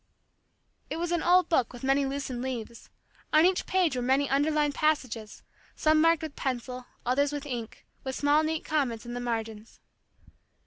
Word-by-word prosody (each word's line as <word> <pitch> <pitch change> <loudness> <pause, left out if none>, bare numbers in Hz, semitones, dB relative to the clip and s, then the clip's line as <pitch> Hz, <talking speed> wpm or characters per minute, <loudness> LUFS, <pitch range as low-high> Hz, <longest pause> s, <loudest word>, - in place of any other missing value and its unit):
It - - -3
was 345 +1 -2
an 345 -2 +1
old 360 0 +4
book 260 -8 +1
with 245 0 -11
many 270 +1 +2
loosened 270 -3 -4
leaves. 235 -3 -6 0.4
On 310 +2 +6
each 370 0 +1
page 360 -7 +2
were 250 - -1
many 265 +3 +2
underlined 295 +1 +1
passages, 255 -9 -1 0.3
some 310 0 +3
marked 330 0 +4
with 310 -3 -6
pencil, 250 -1 -4 0.2
others 280 +3 +2
with 290 0 -5
ink, 240 -5 -6 0.2
with 265 -1 -4
small 290 +1 +3
neat 315 0 -2
comments 255 -7 -1
in 240 - -6
the 245 - -3
margins. 225 -2 -4
275 Hz, 170 wpm, -28 LUFS, 245-310 Hz, 0.4 s, On